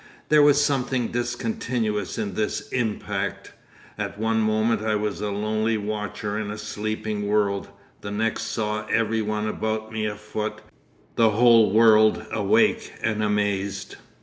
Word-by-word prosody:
'There 150 0 +6
was 145 0 +6
something 130 -3 0
discontinuous 115 -3 -2
in 100 -2 -3
this 105 +2 -2
impact. 115 -4 -3 0.5
At - - -4
one 110 +1 +1
moment 110 0 +1
I 110 0 0
was 105 -3 -2
a 105 - -1
lonely 110 +2 0
watcher 105 0 -3
in 105 -1 -4
a 105 - -5
sleeping 105 -1 -3
world; 100 -1 +1 0.3
the 100 - -6
next 110 +2 -1
saw 105 -1 -2
every 115 -1 +1
one 105 0 -2
about 110 0 -3
me 110 -1 -1
afoot, 105 +1 -5 0.6
the 115 -1 +5
whole 115 -1 +5
world 110 0 +5
awake - - +2
and 110 -1 0
amazed.... 100 -2 -1
110 Hz, 140 wpm, -24 LUFS, 105-115 Hz, 0.6 s, There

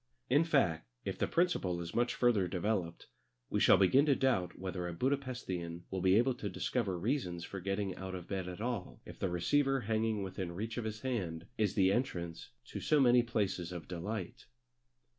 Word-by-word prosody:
In 145 +5 +6
fact, 90 - +2 0.2
if - - -3
the - - +1
principle 165 - +1
is 85 0 -6
much 120 +1 +1
further 115 -7 +3
developed, 90 -1 -2 0.5
we - - +1
shall - - +7
begin 130 +10 +5
to 140 - +5
doubt 95 -11 +1
whether 90 -1 -4
a 85 - -4
Buda 130 +11 +2
Pesthian 95 -11 -5
will 95 -1 -2
be 95 +1 +5
able 125 +4 +4
to 105 -4 -4
discover 95 +2 -1
reasons 90 -5 -1
for 100 - -6
getting 95 +1 -2
out 95 0 -5
of 90 -2 -7
bed 95 -2 -3
at 90 +3 -7
all 115 -5 -3
if - - -11
the 95 - 0
receiver 135 - +2
hanging 110 -1 0
within 95 -2 -4
reach 110 +6 -4
of 115 - -4
his 110 0 -4
hand 90 -11 -2
is 105 -5 0
the 95 -1 +4
entrance 85 - -2 0.2
to - - -6
so 150 - +3
many 125 -2 +6
places 100 -7 -1
of 85 -4 -7
delight. 95 +2 -5
100 Hz, 195 wpm, -34 LUFS, 90-120 Hz, 0.5 s, shall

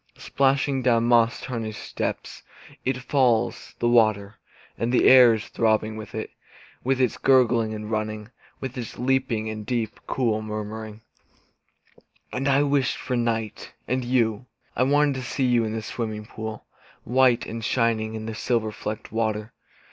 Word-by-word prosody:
Splashing 135 0 +1
down 120 -2 +3
moss 115 -1 +3
tarnished 115 -4 -5
steps - - -4 0.4
It 130 0 0
falls, 125 -3 0
the 120 - 0
water; 110 -3 +2 0.4
And 115 +1 -1
the 125 - +4
air 125 -3 +8
is 110 - -6
throbbing 110 -1 +1
with 110 0 -8
it. 110 - -4 0.5
With 130 +1 +1
its 125 -3 +1
gurgling 120 -4 +3
and 105 0 -6
running. 110 0 -3 0.3
With 130 -1 -6
its 120 - -7
leaping, 125 -4 0
and 110 -1 -5
deep, 115 -1 -3
cool 115 -4 0
murmur. 110 0 -6 1.3
And 135 +3 -1
I 140 +1 +4
wished 140 -3 +1
for 125 - -3
night 115 -3 -2
and 130 0 0
you. 120 -2 0 0.3
I - - 0
wanted 145 +2 +3
to - - -5
see 130 +2 -1
you 120 -2 +3
in 110 - -3
the 110 -1 -4
swimming 110 0 -4
pool, 110 0 -7 0.4
White 125 -1 +3
and 115 0 -6
shining 110 -1 0
in 110 0 -5
the 115 - -4
silver 110 -1 -1
flecked 105 0 -6
water. 110 0 -2
115 Hz, 155 wpm, -24 LUFS, 110-125 Hz, 1.3 s, air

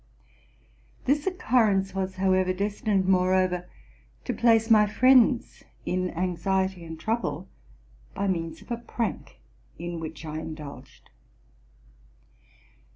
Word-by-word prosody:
This 290 +5 +1
occurrence 220 - +2
was, 190 -1 -3
however, 185 -1 +2
destined 200 0 0
moreover 185 -1 +2 0.6
to - - -1
place 225 -1 +3
my 210 -1 +6
friends 255 +2 +3 0.2
in 185 0 -1
anxiety 185 +1 -1
and 160 -1 -8
trouble 225 - -2 0.7
by 200 - -1
means 165 -3 -3
of - - -15
a 235 - 0
prank 235 0 -5 0.4
in 175 0 -5
which 160 0 -7
I 155 0 -4
indulged. 150 -5 -10
190 Hz, 105 wpm, -26 LUFS, 175-220 Hz, 0.7 s, my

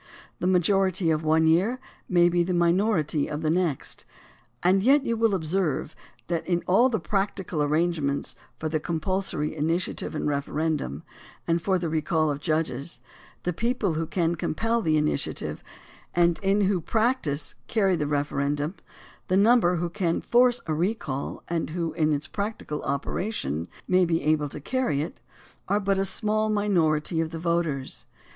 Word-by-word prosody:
The 180 - 0
majority 185 -1 +2
of 155 0 0
one 160 +1 +3
year 190 +11 +3 0.3
may 175 -1 +5
be 175 0 +2
the 180 +1 0
minority 170 -3 +2
of 150 +1 -4
the 155 - +2
next, 170 -5 -1 0.6
and 185 +2 +4
yet 270 +6 +4
you 230 - 0
will 225 -2 +2
observe 165 -3 -1 0.3
that 170 -2 -2
in 175 -1 0
all 230 +8 +4
the 220 -4 0
practical 195 -5 -2
arrangements 150 -1 0 0.2
for 160 - -3
the 155 0 0
compulsory 165 -1 -1
initiative 165 +2 -1
and 150 - -1
referendum 145 - -2 0.4
and 165 0 +1
for 190 +2 +1
the 175 -1 -2
recall 155 0 +1
of 145 - -3
judges, 155 -2 -2 0.4
the 180 - -1
people 225 -1 0
who 160 +1 -2
can 170 -1 0
compel 225 +8 -1
the 155 -6 +2
initiative 150 0 -2 0.5
and 170 -1 +3
who - - -6
in 195 -2 +2
practice 215 - 0
carry 195 -5 +2
the 150 -3 -1
referendum, 145 +1 -1 0.5
the 185 - +2
number 210 -3 +5
who 175 +1 -1
can 170 -2 -1
force 245 0 +3
a 160 - -1
recall 160 -5 -2
and 165 -1 -2
who, 165 0 -2
in 155 -1 +1
its 145 0 -1
practical 200 -7 -4
operation, 140 - -2 0.2
may 185 0 +4
be 165 -1 0
able 150 -1 +1
to 150 - -7
carry 155 - 0
it, - - -8 0.5
are 205 +2 +2
but 195 -1 +1
a 195 - +1
small 215 +2 +1
minority 170 -7 +1
of 160 - -2
the 165 - -6
voters. 165 -5 -2
170 Hz, 160 wpm, -26 LUFS, 155-195 Hz, 0.6 s, may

